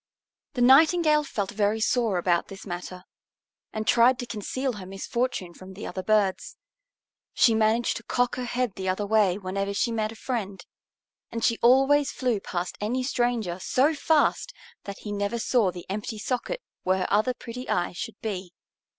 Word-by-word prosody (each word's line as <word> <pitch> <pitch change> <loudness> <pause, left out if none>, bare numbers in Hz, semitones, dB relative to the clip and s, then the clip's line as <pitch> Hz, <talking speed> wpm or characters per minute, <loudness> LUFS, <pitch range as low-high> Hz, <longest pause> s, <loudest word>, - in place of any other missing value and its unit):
The 245 - +2
Nightingale 305 +3 +5
felt 205 -9 -3
very 210 +1 0
sore 225 -3 +1
about 175 -1 +1
this 195 0 -10
matter, 180 0 -6 0.7
and 215 0 -4
tried 240 +3 +5
to 250 - -5
conceal 250 +4 -3
her 200 -4 -8
misfortune 195 -1 -3
from 185 +2 -12
the 205 - -7
other 190 - -4
birds. 210 - 0 0.8
She 235 - +5
managed 220 +2 +2
to 230 - -10
cock 245 +1 0
her 250 - -4
head 245 -2 -1
the 190 -1 -3
other 190 +3 -1
way 200 -3 +3
whenever 195 +1 -3
she 235 - +1
met 215 -1 -1
a - - -10
friend, 205 -6 -4 0.7
and 230 -1 -1
she 230 - +1
always 270 +4 +5
flew 245 -5 -1
past 180 -2 -4
any 245 +5 -1
stranger 240 -8 -1
so 270 - +2
fast 315 +10 +1 0.3
that 200 -1 -6
he 210 - -7
never 205 +3 -1
saw 230 -3 +2
the 175 -1 -8
empty 210 +3 -4
socket 255 - -3 0.2
where 185 +1 +1
her 185 - -1
other 215 +5 +2
pretty 250 +1 -8
eye 175 0 0
should 215 +5 -7
be. 190 -5 -4
220 Hz, 175 wpm, -26 LUFS, 195-250 Hz, 0.8 s, Nightingale